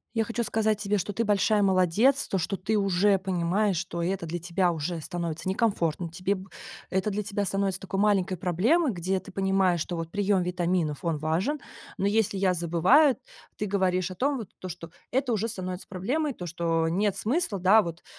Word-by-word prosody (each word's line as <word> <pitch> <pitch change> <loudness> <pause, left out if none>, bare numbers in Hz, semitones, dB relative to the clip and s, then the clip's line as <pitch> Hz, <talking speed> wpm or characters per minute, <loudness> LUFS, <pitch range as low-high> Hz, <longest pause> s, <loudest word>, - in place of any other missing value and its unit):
Я 225 - +2
хочу 235 +1 -2
сказать 215 -1 +1
тебе, 205 0 0
что 200 - -3
ты 230 +3 -1
большая 210 0 +3
молодец, 195 +8 +3
то, 195 - -1
что 180 +3 -1
ты 200 +3 -1
уже 195 0 +3
понимаешь, 190 +1 0
что 170 0 -3
это 180 -1 -2
для 175 +2 -3
тебя 175 +1 0
уже 165 +1 -3
становится 170 +1 -4
некомфортно, 180 -5 0
тебе 185 +4 -1
б 190 +1 -10 0.4
это 190 +3 0
для 210 +1 -2
тебя 200 0 -2
становится 195 0 -1
такой 195 0 -3
маленькой 195 -3 +2
проблемой, 225 - +2
где 185 0 -1
ты 195 - -12
понимаешь, 190 -3 +1
что, 175 - -3
вот, 165 0 -5
прием 200 -2 +1
витаминов 175 -3 -1
он 165 -3 0
важен, 170 - -1 0.4
но 195 - -1
если 205 -1 +1
я 190 -1 +2
забываю, 180 - +4 0.4
ты 210 - -2
говоришь 185 -2 0
о - - -7
том, 275 +6 0
вот, 220 -6 -7
то, 185 - -6
что 170 -1 -8 0.2
это 255 -1 +1
уже 220 +1 0
становится 185 -4 -5
проблемой, 265 - -1
то, 180 - -7
что 165 -1 0
нет 195 +3 0
смысла, 235 - 0
да, 195 +5 +6
вот, 170 -3 -7
190 Hz, 195 wpm, -27 LUFS, 175-210 Hz, 0.4 s, да